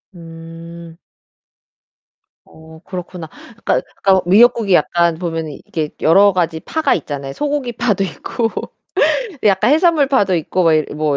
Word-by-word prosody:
음. 165 Hz, 0 st, -12 dB, 1.5 s
어 160 Hz, 0 st, -16 dB
그렇구나. 180 Hz, -2 st, -7 dB
그러니까 230 Hz, +8 st, -4 dB, 0.2 s
그러니까 195 Hz, -, +5 dB
뭐 190 Hz, -, +2 dB
미역국이 215 Hz, +1 st, +4 dB
약간 170 Hz, 0 st, +2 dB
보면은 165 Hz, -3 st, -4 dB
이게 155 Hz, -2 st, -3 dB
여러 200 Hz, +5 st, +5 dB
가지 170 Hz, -3 st, -1 dB
파가 315 Hz, 0 st, 0 dB
있잖아요. 140 Hz, -3 st, -6 dB
소고기 290 Hz, -, -3 dB
파도 220 Hz, -5 st, 0 dB
있고 195 Hz, -, -3 dB, 1.0 s
약간 210 Hz, +3 st, +3 dB
해산물 320 Hz, -2 st, +3 dB
파도 205 Hz, -9 st, +2 dB
있고 175 Hz, +2 st, -1 dB
뭐 165 Hz, -2 st, +4 dB
이 155 Hz, -1 st, +2 dB
뭐 150 Hz, -2 st, -1 dB
175 Hz, 295 characters per minute, -17 LUFS, 160-215 Hz, 1.5 s, 그러니까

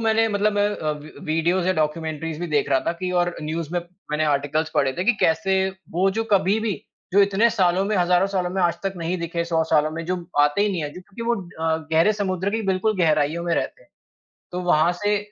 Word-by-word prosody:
मैंने 225 Hz, 0 st, +2 dB
मतलब 210 Hz, 0 st, +1 dB
मैं 205 Hz, 0 st, +2 dB
अ, 155 Hz, -, -2 dB
वी 150 Hz, +1 st, -10 dB
वीडियोज़ 170 Hz, +3 st, +1 dB
या 185 Hz, -, +3 dB
डॉक्युमेंट्रीज़ 155 Hz, 0 st, -2 dB
भी 175 Hz, -, -2 dB
देख 145 Hz, -1 st, +1 dB
रहा 135 Hz, -, +3 dB
था -, -, +2 dB
कि 185 Hz, -1 st, -2 dB
और 175 Hz, 0 st, 0 dB
न्यूज़ 155 Hz, 0 st, -3 dB
में, 175 Hz, -, 0 dB, 0.3 s
मैंने 155 Hz, +1 st, +1 dB
आर्टिकल्स 150 Hz, +2 st, 0 dB
पढ़े 135 Hz, -1 st, +2 dB
थे 180 Hz, -, -2 dB
कि 245 Hz, -, +5 dB
कैसे 175 Hz, +4 st, +2 dB, 0.3 s
वो 185 Hz, +4 st, +2 dB
जो 225 Hz, -, +1 dB
कभी 200 Hz, +2 st, +3 dB
भी, 220 Hz, -2 st, 0 dB, 0.4 s
जो 200 Hz, -, +5 dB
इतने 200 Hz, +4 st, +3 dB
सालों 190 Hz, -3 st, +2 dB
में, 210 Hz, 0 st, 0 dB
हजारों 180 Hz, +1 st, +3 dB
सालों 180 Hz, -1 st, 0 dB
में 190 Hz, +1 st, -2 dB
आज 170 Hz, -1 st, +3 dB
तक 195 Hz, -, 0 dB
नहीं 175 Hz, +2 st, -2 dB
दिखे 170 Hz, 0 st, -2 dB
100 165 Hz, -1 st, +1 dB
सालों 155 Hz, -1 st, +3 dB
में 165 Hz, +1 st, -5 dB
जो 185 Hz, -, 0 dB, 0.2 s
आते 145 Hz, +7 st, +3 dB
ही 210 Hz, -, +2 dB
नहीं 170 Hz, -4 st, -2 dB
हैं 145 Hz, -, -4 dB
जो 180 Hz, -, -8 dB, 0.2 s
कि 230 Hz, -, -4 dB
वो 235 Hz, +1 st, +1 dB
अ, 165 Hz, -4 st, -2 dB, 0.2 s
गहरे 165 Hz, +7 st, +4 dB
समुद्र 190 Hz, -2 st, -1 dB
की 225 Hz, +1 st, -1 dB
बिल्कुल 210 Hz, +3 st, 0 dB
गहराइयों 155 Hz, 0 st, +2 dB
में 170 Hz, -, +1 dB
रहते -, -, -3 dB
हैं। -, -, -27 dB, 0.6 s
तो 180 Hz, -, -2 dB
वहाँ 160 Hz, +2 st, +4 dB
से 210 Hz, 0 st, +3 dB
175 Hz, 235 wpm, -23 LUFS, 160-195 Hz, 0.6 s, कि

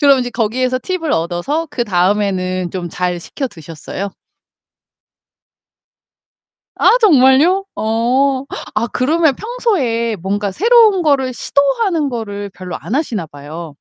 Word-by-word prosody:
그럼 280 Hz, -2 st, +5 dB
이제 245 Hz, -1 st, -2 dB
거기에서 250 Hz, +3 st, 0 dB
팁을 365 Hz, -5 st, -2 dB
얻어서 175 Hz, -, -1 dB
그다음에는 185 Hz, -, 0 dB
좀 180 Hz, -2 st, -4 dB
잘 180 Hz, +1 st, -2 dB
시켜 270 Hz, -, -4 dB
드셨어요? 165 Hz, +4 st, -7 dB, 2.7 s
아 -, -, +4 dB
정말요? 325 Hz, -, +5 dB
어 255 Hz, +5 st, +1 dB, 0.3 s
아 215 Hz, +2 st, +1 dB
그러면 300 Hz, +5 st, +2 dB
평소에 285 Hz, -, -1 dB
뭔가 200 Hz, +3 st, -2 dB
새로운 440 Hz, -, +4 dB
거를 275 Hz, -5 st, +2 dB
시도하는 295 Hz, -, +1 dB
거를 205 Hz, -5 st, -5 dB
별로 180 Hz, -1 st, -6 dB
안 225 Hz, -, -5 dB
하시나 230 Hz, -, -1 dB
봐요. 155 Hz, +3 st, -9 dB
240 Hz, 255 characters per minute, -16 LUFS, 190-295 Hz, 2.7 s, 그럼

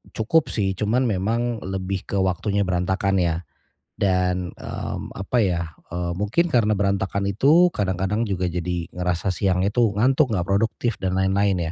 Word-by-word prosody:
cukup 145 Hz, +9 st, +2 dB
sih. 100 Hz, -3 st, 0 dB
Cuman 110 Hz, +6 st, +1 dB
memang 115 Hz, +4 st, -1 dB
lebih 95 Hz, 0 st, -4 dB
ke -, -, -4 dB
waktunya 100 Hz, +2 st, 0 dB
berantakan 95 Hz, +1 st, 0 dB
ya. 85 Hz, -2 st, +1 dB, 0.6 s
Dan, 90 Hz, -2 st, 0 dB
mmm, -, -, -6 dB
apa 100 Hz, +6 st, -3 dB
ya? 90 Hz, -3 st, 0 dB, 0.3 s
E 85 Hz, -, -4 dB, 0.2 s
mungkin 105 Hz, -, +1 dB
karena 120 Hz, -9 st, +2 dB
berantakan 100 Hz, 0 st, 0 dB
itu 145 Hz, -, +5 dB
kadang-kadang 95 Hz, +2 st, 0 dB
juga 95 Hz, -4 st, -1 dB
jadi 85 Hz, 0 st, -3 dB
ngerasa 90 Hz, +1 st, -1 dB
siangnya 95 Hz, 0 st, +1 dB
tuh 120 Hz, -4 st, +3 dB
ngantuk, 130 Hz, +4 st, +3 dB
enggak 90 Hz, -3 st, -1 dB
produktif 110 Hz, +3 st, 0 dB
dan 95 Hz, 0 st, 0 dB
lain-lain 95 Hz, 0 st, +2 dB
100 Hz, 150 wpm, -23 LUFS, 90-110 Hz, 0.6 s, itu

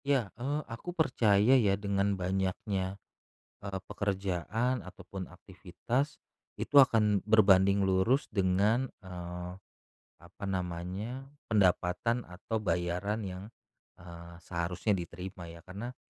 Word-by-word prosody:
Ya, 135 Hz, -8 st, +1 dB
eee, 140 Hz, +5 st, -2 dB
aku 145 Hz, +10 st, -7 dB
percaya 115 Hz, -6 st, +4 dB
ya 100 Hz, -3 st, +2 dB
dengan 100 Hz, 0 st, 0 dB
banyaknya, 95 Hz, +1 st, -1 dB, 0.7 s
eee, 100 Hz, -1 st, -3 dB
pekerjaan 100 Hz, +5 st, -1 dB
ataupun 95 Hz, +1 st, -8 dB
aktivitas 95 Hz, +10 st, -4 dB, 0.4 s
itu 145 Hz, -, -1 dB
akan 110 Hz, -7 st, +6 dB
berbanding 100 Hz, -2 st, +5 dB
lurus 95 Hz, +8 st, +2 dB
dengan, 100 Hz, +6 st, +2 dB
eee, 90 Hz, -1 st, -7 dB, 0.6 s
apa 85 Hz, +3 st, -14 dB
namanya, 95 Hz, +6 st, -3 dB, 0.2 s
pendapatan 100 Hz, +3 st, +2 dB
atau 95 Hz, +5 st, -4 dB
bayaran 90 Hz, +3 st, -1 dB
yang, 95 Hz, -1 st, -6 dB, 0.5 s
eee, 85 Hz, -1 st, -11 dB
seharusnya 85 Hz, +4 st, -2 dB
diterima 90 Hz, -1 st, -4 dB
ya. 85 Hz, 0 st, -11 dB
Karena, 105 Hz, +7 st, -7 dB
95 Hz, 105 wpm, -31 LUFS, 90-110 Hz, 0.7 s, akan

